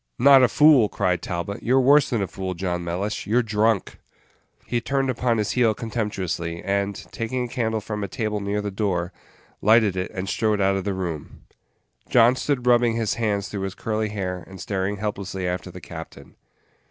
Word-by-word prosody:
"Not 135 +1 +7
a 125 - +6
fool!" 145 -6 +5
cried 90 -3 0
Talbot; 90 +3 -4
"you're 130 +3 +3
worse 140 +3 +5
than 115 -6 0
a - - -2
fool, 95 -1 -5
John 90 -1 -2
Mellish 95 +5 -3
you're 120 +4 +3
drunk!" 110 -1 0 0.7
He 120 -1 -1
turned 135 +2 0
upon 120 -1 0
his 105 -2 0
heel 115 -4 +2
contemptuously, 95 -7 -3
and, 100 0 -1 0.2
taking 125 +2 -2
a - - -3
candle 110 -3 -1
from 105 0 -4
a - - -2
table 110 -3 -2
near 100 +1 -2
the 105 - -3
door, 95 -3 -1 0.5
lighted 110 -2 +4
it, 90 0 -2
and 95 +1 -5
strode 105 0 0
out 95 0 +2
of 95 -1 -3
the 100 -2 -1
room, 85 -6 -5 0.7
John 120 +1 +5
stood 130 -2 -1
rubbing 120 -2 +4
his 115 -2 0
hands 105 -3 -1
through 100 - -5
his 95 -1 -4
curly 110 -1 -2
hair, 90 -4 -4
and 95 -1 -11
staring 100 -1 -2
helplessly 100 -3 -4
after 90 +1 -3
the - - -9
captain. - - -10
105 Hz, 190 wpm, -23 LUFS, 95-115 Hz, 0.7 s, Not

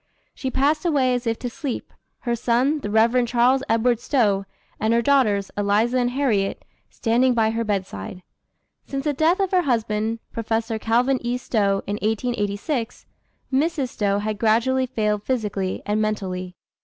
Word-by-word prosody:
She 265 - -4
passed 290 +5 +1
away 280 -7 +2
as 245 -1 -2
if 225 0 0
to 250 - -4
sleep, 265 0 -5 0.3
her 240 -1 -1
son, 250 +6 +1
the 205 - -5
Rev. 230 +4 +3
Charles 245 +2 +3
Edward 230 +1 +2
Stowe, 210 -7 +1 0.3
and 220 +2 +2
her 235 - +3
daughters, 220 -8 +2
Eliza 210 +5 +2
and 245 0 +1
Harriet, 245 -7 0 0.2
standing 245 +2 +2
by 220 -1 +2
her 230 +1 -1
bedside. 185 - -4 0.6
Since 275 -1 -3
the 295 -1 0
death 320 +7 +2
of 390 -2 0
her 370 -1 +4
husband, 225 -5 0
Professor 225 0 -2
Calvin 245 +4 +2
E. 240 +1 -1
Stowe, 200 -5 0
in 205 +1 -2
1886, 225 +2 -2 0.5
Mrs. 285 -1 +1
Stowe 200 -3 0
had 210 0 -3
gradually 245 +4 +2
failed 210 -4 -1
physically 205 -6 -2
and 210 +1 0
mentally. 185 -4 -3
230 Hz, 155 wpm, -23 LUFS, 210-260 Hz, 0.6 s, her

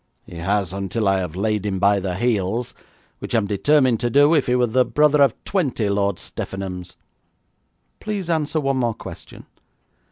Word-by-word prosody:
'He 85 - -11
has, 95 +1 -1
until 100 +2 -2
I 95 0 +3
have 90 -3 -4
laid 105 +1 -1
him 100 -2 -2
by 100 +1 +3
the 95 -2 -3
heels, 115 +1 -1 0.5
which - - -4
I - - +5
am 110 - +1
determined 120 +4 +2
to 120 - 0
do 145 +5 +5
if 150 -4 +2
he 125 - +2
were 125 -1 +3
the 125 +2 +2
brother 150 +2 +3
of 135 -5 +4
twenty 135 - -1
Lord 100 -1 +1
Steffenhams.' 90 -2 -6 1.0
'Please 205 -4 -4
answer 160 -2 0
one 135 -2 0
more 120 -3 0
question. - - -11
110 Hz, 180 wpm, -21 LUFS, 95-135 Hz, 1.0 s, I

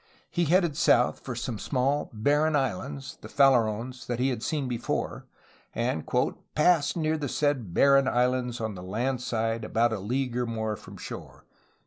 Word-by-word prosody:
He 175 -1 +1
headed 170 -1 +3
south 140 -6 +3
for 125 - -6
some 120 -2 -4
small 140 +2 0
barren 145 +8 +2
islands 95 - -3
(the - - -8
Farallones) 125 -2 +2
that 120 - -2
he 130 +2 +1
had 120 -4 -3
seen 145 +1 -1
before, 120 -1 -3 0.5
and 115 -9 -1
'^ - - 0 0.2
passed 150 -2 +3
near 160 -1 0
the 145 -3 -3
said 140 - 0
barren 140 -1 +5
islands 125 -1 +1
on 110 -2 -3
the 90 - -8
land 120 +7 -2
side 115 -1 -1
about 115 0 +1
a 110 - -3
league 125 +5 -2
or 125 -1 0
more 110 -2 -2
from - - -12
shore. - - -9
125 Hz, 170 wpm, -27 LUFS, 115-140 Hz, 0.5 s, barren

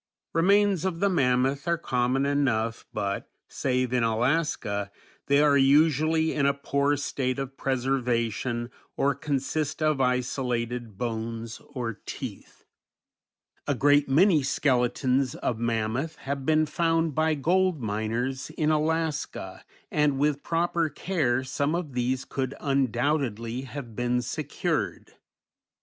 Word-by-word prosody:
Remains 195 +1 +3
of 185 -3 -2
the 200 +1 +2
mammoth 135 -1 +1
are 170 0 +2
common 130 -2 0
enough 120 -6 0
but, 100 -2 -3 0.2
save 125 -2 -1
in 125 - +2
Alaska, 115 -3 0 0.4
they 140 0 +4
are 145 -1 +5
usually 155 +3 +4
in 140 -2 +2
a 140 - +2
poor 140 +1 +1
state 130 -2 -2
of 135 -1 -5
preservation 120 -3 -1 0.3
or 140 +1 +2
consist 140 +2 -2
of 155 -3 +1
isolated 125 -3 -1
bones 115 0 -4
or 115 -4 -4
teeth. - - -8 1.0
A 145 - +1
great 145 +2 +4
many 160 +3 +5
skeletons 130 -1 +1
of 115 -3 -2
mammoth 115 +7 -1
have 135 -2 -5
been 155 0 +4
found 165 0 +1
by 155 +2 +2
gold 180 +3 +2
miners 115 +5 -2
in 155 -1 +2
Alaska, 155 0 -1 0.3
and 150 -2 +2
with 145 0 +1
proper 170 -1 0
care 145 -6 0
some 140 +4 -1
of 165 -6 -4
these 125 +2 -1
could 135 0 -3
undoubtedly 130 -3 0
have 125 -6 -7
been 125 +1 0
secured. 120 - -3
135 Hz, 125 wpm, -27 LUFS, 120-155 Hz, 1.0 s, are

